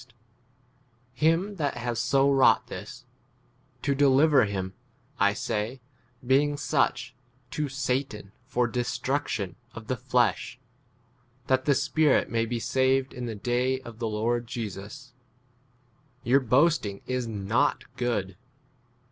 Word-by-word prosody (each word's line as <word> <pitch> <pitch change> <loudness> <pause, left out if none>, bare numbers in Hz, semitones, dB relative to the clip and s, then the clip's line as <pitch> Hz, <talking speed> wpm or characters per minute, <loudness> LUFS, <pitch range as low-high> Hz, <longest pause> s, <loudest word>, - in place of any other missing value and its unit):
5 - - -17 1.0
him 165 +9 +1
that 145 -4 -1
has 120 -1 -2
so 135 +4 +3
wrought 135 -1 +4
this: - - -9 0.8
to 140 - +2
deliver 140 0 +5
him, 95 -2 -4 0.5
[I 100 +1 +3
say], 110 +3 -3 0.5
[being] 145 +3 +3
such, 125 -4 0 0.4
to 150 -1 -2
Satan 130 -6 -2 0.2
for 125 -2 +1
destruction 120 - -2 0.2
of 115 - -8
the 130 - -1
flesh, 125 -1 0 0.9
that 130 0 +1
the 140 - +4
spirit 150 +1 +2
may 115 0 0
be 120 0 -2
saved 130 +2 +1
6 - - -14
in 120 - -3
the 115 - -4
day 125 +4 0
of 120 -3 -11
the 115 -2 -1
Lord 115 +3 -1
Jesus. 115 +5 -7 1.1
Your 130 +3 +4
boasting 125 -5 +2
[is] 125 -2 -2
not 110 +1 0
good. 100 -7 -2
125 Hz, 125 wpm, -27 LUFS, 115-135 Hz, 1.1 s, deliver